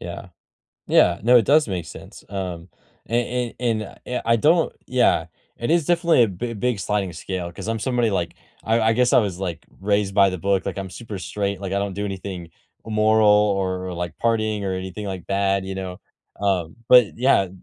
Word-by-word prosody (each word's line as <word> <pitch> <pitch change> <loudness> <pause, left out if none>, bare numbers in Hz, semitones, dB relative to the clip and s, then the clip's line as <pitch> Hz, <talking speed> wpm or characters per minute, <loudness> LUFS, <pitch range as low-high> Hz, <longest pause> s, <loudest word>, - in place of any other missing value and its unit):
Yeah. 85 +2 -7 0.6
Yeah, 85 +1 +4
no, 125 +3 +6
it 115 - +5
does 150 -1 +4
make 90 -4 -3
sense, - - -12
um, 90 -3 -5 0.4
an 120 +1 -1
an 115 -3 0
and, - - -11
eh, 125 - -3
I 115 - +4
don't 160 +8 +3
yeah, 120 -10 +2 0.3
it 120 - -3
is 165 -3 +2
definitely 170 -7 +4
a 110 - -1
b 115 +6 -5
big 120 0 -1
sliding 100 -3 -1
scale 90 +1 -5
'cause 105 - -8
I'm 115 0 -1
somebody, 120 -1 0
like, 85 -4 -2 0.3
I 115 +1 +2
I 110 0 +3
guess 125 +1 +2
I - - +7
was, 95 -4 -3
like, 90 -4 -4 0.2
raised 100 0 +1
by 100 -1 +6
the 95 - -4
book, 100 +2 0
like, - - -3
I'm 95 -2 -5
super 105 +1 -7
straight, 100 +3 -3
like, 95 -1 -5
I 100 - +1
don't 100 -1 -3
do 100 +2 -3
anything 95 -3 -6 0.3
immoral 110 0 +3
or 95 -3 +2
or, - - -5
like, 85 0 -4
partying 110 -3 0
or 95 - -1
anything 95 +2 -6
like 95 -3 -5
that, 100 0 +1
you 95 0 -5
know, 90 -1 -6 0.4
um, 90 -5 -1
but 125 -4 +6
yeah 120 -6 +3
100 Hz, 205 wpm, -22 LUFS, 95-115 Hz, 0.6 s, I